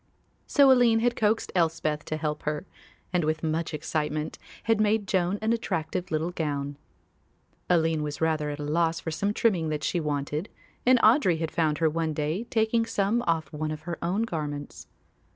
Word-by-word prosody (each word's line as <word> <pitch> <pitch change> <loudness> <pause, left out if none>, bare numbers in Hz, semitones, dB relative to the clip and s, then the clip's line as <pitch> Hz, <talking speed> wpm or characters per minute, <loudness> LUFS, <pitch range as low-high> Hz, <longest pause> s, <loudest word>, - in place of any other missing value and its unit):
So 280 -2 +6
Aline 240 -3 +5
had 240 0 +2
coaxed 220 +1 +1
Elspeth 160 -3 0
to 155 - -3
help 150 -1 -2
her, 150 +4 -3 0.5
and, 175 -2 +2
with 155 +1 -1
much 160 +1 -1
excitement, 155 0 -2 0.2
had 225 -2 +2
made 210 -1 +2
Joan 185 +1 +1
an 220 +1 +2
attractive 180 -5 -2
little 160 +2 -1
gown. 145 -4 -3 0.9
Aline 165 -3 +2
was 150 -1 -4
rather 155 -2 +1
at 145 - -4
a 150 - -5
loss 165 +2 +1
for 160 - -4
some 200 +6 0
trimming 190 -7 +1
that 150 -1 -3
she 175 - 0
wanted 150 +3 -2 0.4
and 255 0 +7
Audry 215 - +5
had 160 0 -3
found 155 -3 +1
her 160 - +2
one 160 0 -1
day 155 +9 -1
taking 230 0 +1
some 215 +2 +1
off 165 -2 0
one 155 +1 -2
of 155 0 -5
her 170 +2 -5
own 185 +6 0
garments. 150 -8 -5
165 Hz, 180 wpm, -27 LUFS, 155-205 Hz, 0.9 s, and